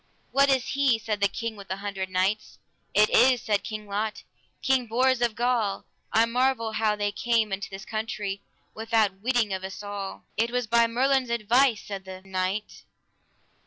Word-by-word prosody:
What 275 +1 +4
is 265 -2 +2
he? 275 -4 +3
said 215 -2 -3
the 200 - +5
King 230 +3 -4
with 200 -1 -11
the 190 - -2
Hundred 195 -1 -4
Knights. 185 +3 -1 0.4
It 215 0 +5
is, 255 -1 +5
said 205 -2 0
King 215 -1 -6
Lot, 210 +2 -3 0.4
King 265 -2 +2
Bors 255 +2 +2
of 235 -3 +1
Gaul; 235 -4 0 0.3
I 225 +1 +4
marvel 245 -1 +1
how 215 -1 +1
they 205 0 -1
came 225 -1 +1
into 200 +1 -4
this 195 0 -8
country 215 -3 -3 0.3
without 220 -3 +1
witting 235 -3 +1
of 190 0 -4
us 190 +2 -7
all. 205 -1 -6
It 230 +2 +2
was 245 0 -1
by 235 +1 +4
Merlin's 260 +2 +1
advice, 235 +1 +2
said 195 -2 -7
the 190 0 -9
knight. 190 +2 -3
220 Hz, 175 wpm, -26 LUFS, 200-240 Hz, 0.4 s, the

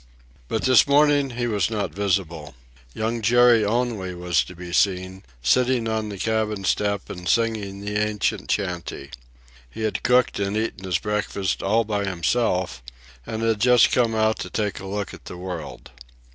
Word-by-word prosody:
But 110 - -2
this 130 0 +5
morning 145 -1 +4
he 120 -1 -3
was 105 -3 0
not 100 -7 -3
visible. 85 -7 -2 0.4
Young 115 +1 -2
Jerry 120 0 +5
only 105 -4 -1
was 90 -1 +1
to 90 - -11
be 90 0 -8
seen, 95 0 +1 0.2
sitting 125 - +2
on 110 -1 -2
the 100 - -6
cabin 110 -1 -1
step 100 +2 0
and 90 -1 -6
singing 110 -4 0
the 105 +1 -3
ancient 105 -1 -1
chantey. 90 -8 -3 0.6
He 110 - -7
had 105 -3 -1
cooked 125 -3 +2
and 100 +1 -1
eaten 110 -3 -3
his 90 -2 +1
breakfast 105 -1 -2
all 110 +4 +2
by 105 -2 -2
himself, 90 - 0 0.5
and 110 0 -4
had 110 -2 +1
just 125 0 +5
come 115 -3 +2
out 110 0 +1
to - - -5
take 105 -2 -2
a 95 - -8
look 100 0 -4
at - - -13
the 90 - -8
world. 90 -8 -7
105 Hz, 170 wpm, -23 LUFS, 95-115 Hz, 0.6 s, this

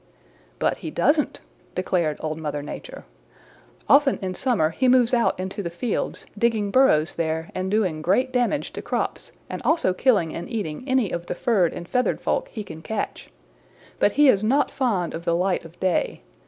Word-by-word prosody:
"But - - 0
he - - -6
doesn't," - - +1 0.3
declared 175 -4 0
Old 155 0 -3
Mother 150 -2 -3
Nature. - - -8 0.8
"Often 280 -1 +5
in 185 -1 -2
summer 190 -8 +1
he 260 +9 +1
moves 250 -1 +4
out 235 -6 +2
into 190 +2 -4
the 170 - -3
fields, 200 +7 -3
digging 215 -2 +1
burrows 185 - +4
there 160 0 -2
and 185 0 -2
doing 190 -7 0
great 250 +11 +1
damage 250 +4 0
to - - -5
crops - - -3 0.2
and - - -6
also 320 - +2
killing 195 -6 +2
and 170 - -6
eating 205 -1 -4
any 255 -7 +2
of 170 0 -4
the - - -3
furred 200 -9 +2
and 175 - -7
feathered 250 +4 0
folk - - -1
he 215 - -6
can 160 -5 -10
catch. 215 +5 -4 0.7
But 205 - +3
he 295 +1 +5
is 205 -6 +4
not 270 +7 +2
fond 210 -10 0
of 165 - -5
the 170 -1 +1
light 180 +1 0
of 165 +1 -14
day. 185 -2 0
195 Hz, 180 wpm, -24 LUFS, 170-245 Hz, 0.8 s, Often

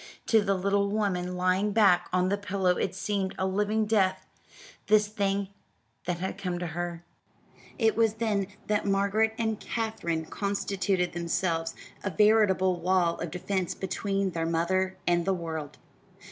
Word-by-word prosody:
To 220 -2 +4
the 200 -1 +1
little 200 +1 +1
woman 180 -4 -1
lying 185 +3 +1
back 195 -5 +4
on 185 0 +2
the 200 - +2
pillow 200 -2 0
it 185 - -2
seemed 195 -1 -2
a 190 - 0
living 210 +3 +1
death 190 -3 +1 0.6
this 210 0 +5
thing 200 -2 -1 0.6
that 175 -1 -1
had 190 +2 -4
come 180 -2 -2
to 175 - -3
her. 175 0 -4 0.7
It 225 -3 +2
was 225 -1 +2
then 215 -4 0 0.2
that 210 -1 0
Margaret 200 +3 +2
and 220 -2 -1
Katherine 195 -8 -2
constituted 195 -1 -1
themselves 170 -1 -1 0.3
a 200 - -1
veritable 190 -2 +3
wall 175 -1 +1
of 170 - -3
defense 180 +2 -2
between 195 0 -1
their 165 -1 -2
mother 185 +3 0
and 175 -1 +2
the 190 +2 +1
world. 160 -4 -5
190 Hz, 150 wpm, -28 LUFS, 180-205 Hz, 0.7 s, this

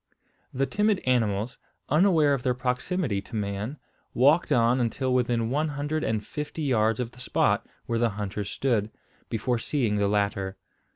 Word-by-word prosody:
The 135 +1 0
timid 210 +5 +2
animals, 115 -3 0 0.3
unaware 155 -2 +4
of 135 - -1
their 125 -1 0
proximity 125 - -1
to 115 - -10
man, 105 +6 -3 0.4
walked 145 +7 +4
on 120 +2 +4
until 125 +2 0
within 120 -2 +1
one 150 +3 +1
hundred 145 +1 -2
and 110 -2 -1
fifty 150 +1 -5
yards 115 -5 +2
of 120 -2 -2
the 125 - -17
spot 125 - +1 0.2
where 115 -1 -1
the 120 0 +3
hunters 105 -1 -4
stood, 115 -6 0 0.4
before 120 +2 0
seeing 115 -5 0
the 100 0 +2
latter. 100 -2 0
125 Hz, 160 wpm, -27 LUFS, 105-140 Hz, 0.4 s, unaware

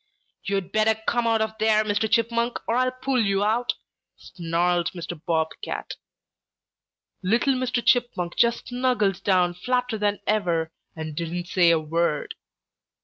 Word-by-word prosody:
"'You'd 195 -2 -2
better 220 0 +3
come 240 -1 +1
out 225 -1 +2
of 220 0 -4
there, 215 0 +3
Mr. 215 +1 0
Chipmunk, 235 +2 +1
or 230 - +1
I'll 255 +1 +2
pull 255 0 -1
you 200 -1 +1
out!' 225 +4 +1 0.4
snarled 175 0 -1
Mr. 170 -2 -7
Bob 160 -1 +1
Cat. - - -5 1.3
"Little 230 +8 +2
Mr. 250 -2 -1
Chipmunk 240 -9 +1
just 235 0 +1
snuggled 245 -7 0
down 180 -3 +3
flatter 250 +4 -1
than 205 0 0
ever 170 -6 0 0.2
and 155 -2 -6
didn't 175 +2 -4
say 175 -2 +4
a 165 - +5
word. 155 0 -1
205 Hz, 145 wpm, -24 LUFS, 175-235 Hz, 1.3 s, a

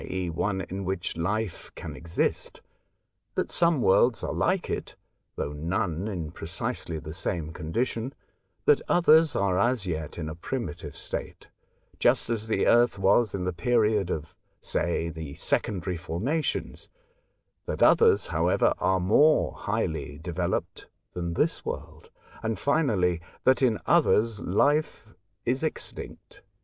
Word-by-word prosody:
e., 90 -2 -3
one 95 +4 -1
in 95 +2 -5
which 95 -1 -3
life 100 +3 -2
can - - -7
exist; 85 0 -2 0.7
that - - -1
some 170 -6 +3
worlds 115 +5 +4
are - - -2
like - - +1
it - - -4 0.4
(though 75 - -3
none 85 +4 -2
in 85 -7 -4
precisely 80 - -4
the 80 0 -7
same 80 -2 -2
condition); 115 +10 -2 0.5
that 445 - +5
others 160 -3 +5
are 95 -2 +1
as 120 0 +1
yet 80 -4 -4
in 80 -2 -4
a 80 - -4
primitive 110 - -5
state, - - -6 0.5
just - - +3
as 110 -1 -2
the 110 - +1
Earth 120 -2 +4
was 100 +3 +3
in 95 - -3
the 90 0 -1
period 105 +1 +2
of, 75 -3 -4 0.3
say, 85 0 -1
the 80 -3 -7
secondary 90 -3 -1
formations; 105 - -2 0.8
that - - 0
others, 455 -1 +5
however, - - +2
are 95 0 +2
more 145 +12 +4
highly 80 -9 -3
developed 85 +2 -3 0.3
than 85 -1 -3
this - - 0
world; - - -7 0.3
and, 110 -1 -2
finally, 100 - +1 0.2
that 130 +1 +4
in 120 -5 +3
others 110 -1 +3
life 145 - +1 0.4
is 130 +3 0
extinct. 160 - -6
95 Hz, 135 wpm, -27 LUFS, 85-120 Hz, 0.8 s, that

